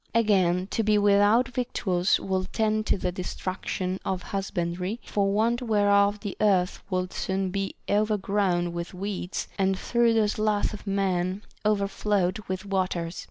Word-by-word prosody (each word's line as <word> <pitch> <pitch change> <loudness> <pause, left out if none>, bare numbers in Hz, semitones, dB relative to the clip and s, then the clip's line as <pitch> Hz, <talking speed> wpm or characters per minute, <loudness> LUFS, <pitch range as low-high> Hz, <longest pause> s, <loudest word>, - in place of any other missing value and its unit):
Again, 185 -5 +3
to - - +1
be 215 -1 +3
without 205 +5 +4
victuals 210 -7 0
would 190 -1 -2
tend 215 0 0
to - - +2
the 180 -1 -2
destruction 185 +1 -3
of 190 -2 -2
husbandry, 185 +1 -3
for 200 -1 0
want 230 +4 +1
whereof 205 -2 +3
the 205 -3 -5
earth 190 -3 +2
would 185 -1 -2
soon 190 -1 -1
be 195 0 -3
overgrown 200 -4 +1
with 170 +2 -5
weeds, 195 -1 -4
and 190 0 +2
through 235 +2 +2
the 220 -2 +3
sloth 215 0 0
of 210 - -9
men 190 0 0 0.2
overflowed 200 -2 +1
with 185 +1 -4
waters. 185 -3 -2
195 Hz, 145 wpm, -26 LUFS, 185-210 Hz, 0.2 s, without